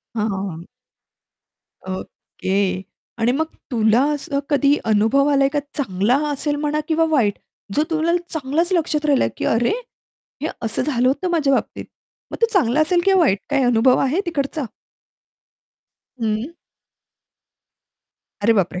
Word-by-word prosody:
हां, 215 0 0
हां, 195 0 -3
हां. 170 +1 -9 1.2
ओके! 190 0 -3 0.4
आणि 230 +2 +2
मग 305 +5 +1 0.3
तुला 225 0 +3
असं 280 -1 -2
कधी 285 0 +3
अनुभव 225 +6 +3
आला 280 -1 +3
आहे - - +4
का 295 - -1 0.2
चांगला 220 -2 +1
असेल 290 +1 -1
म्हणा 300 +1 -1
किंवा 325 0 +2
वाईट. 235 -10 +2 0.4
जो 300 - +3
तुला 325 +1 +1 0.2
चांगलाच 315 +4 -1
लक्षात 315 -4 0
राहिला 280 -3 +3
आहे, - - -1
की - - -4
"अरे 235 +1 +2 0.7
हे 310 - 0
असं 225 +1 0
झालं 255 -2 +1
होतं 360 +7 0
माझ्या 305 -5 +2
बाबतीत!" - - -1 0.5
मग - - -5
तो - - +7
चांगला 310 - +2
असेल 345 +3 +3
किंवा 385 -1 +4
वाईट 205 - +3
काय 280 -2 +2
अनुभव 245 +1 +4
आहे 275 +7 +1
तिकडचा? 300 -2 -2 1.6
हं. 225 +6 -2 1.9
अरे 230 +3 +5
बापरे! 180 -4 0
275 Hz, 145 wpm, -20 LUFS, 225-305 Hz, 1.9 s, तो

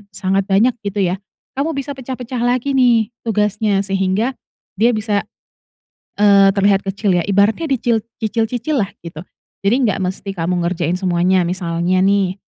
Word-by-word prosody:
sangat 195 +1 0
banyak 205 +6 +3
gitu 205 -1 -2
ya 185 +1 -1 0.4
kamu 310 +2 -1
bisa 275 +1 -4
pecah-pecah 255 -2 -6
lagi 245 +3 0
nih 240 -4 +3
tugasnya 210 -2 0
sehingga 195 +4 0 0.5
dia 235 +2 +3
bisa, 210 -1 -1 0.9
eee, 200 -1 +6
terlihat 200 0 +2
kecil 195 0 0
ya 175 - +1
ibaratnya 205 - +1
dicil 235 -4 +1 0.2
cicil-cicillah 225 +1 -1
gitu, 165 -1 -9 0.4
jadi 200 +4 +3 0.2
gak - - -5
mesti 195 +1 -4
kamu 175 0 -1
ngerjain 175 0 -1
semuanya 180 -1 +1
misalnya 180 0 0
nih 195 -1 +2
200 Hz, 140 wpm, -18 LUFS, 185-230 Hz, 0.9 s, eee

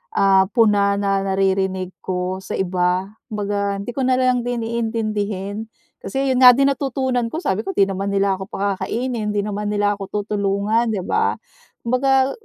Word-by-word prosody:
ah, 190 -1 +4
puna 205 -3 +4
na 195 -1 0
naririnig 190 -1 0
ko 185 0 -3
sa 190 - -6
iba, 185 +1 0 0.2
kumbaga 205 -2 -2
hindi 200 +4 -5
ko 270 - -4
na 255 - +3
lang 255 -1 +2
din 240 -2 -2
iintindihin. 215 -3 -3 0.3
Kasi 270 0 -1
'yon 255 - +1
nga 250 -2 +9
din 275 +1 +3
natutunan 260 -3 -1
ko, 320 +9 -5
sabi 195 +2 -1
ko, 195 - -3
"'Di 200 - +5
naman 195 0 -2
nila 195 -1 +1
ako 190 - -6
pakakainin, 210 +3 -2
'di 205 - +1
naman 210 0 -3
nila 205 0 +1
ako 195 - -5 0.2
tutulungan."'Di 205 +1 0
ba? - - +1 0.5
Kumbaga 265 +2 +2
205 Hz, 165 wpm, -20 LUFS, 195-235 Hz, 0.5 s, nga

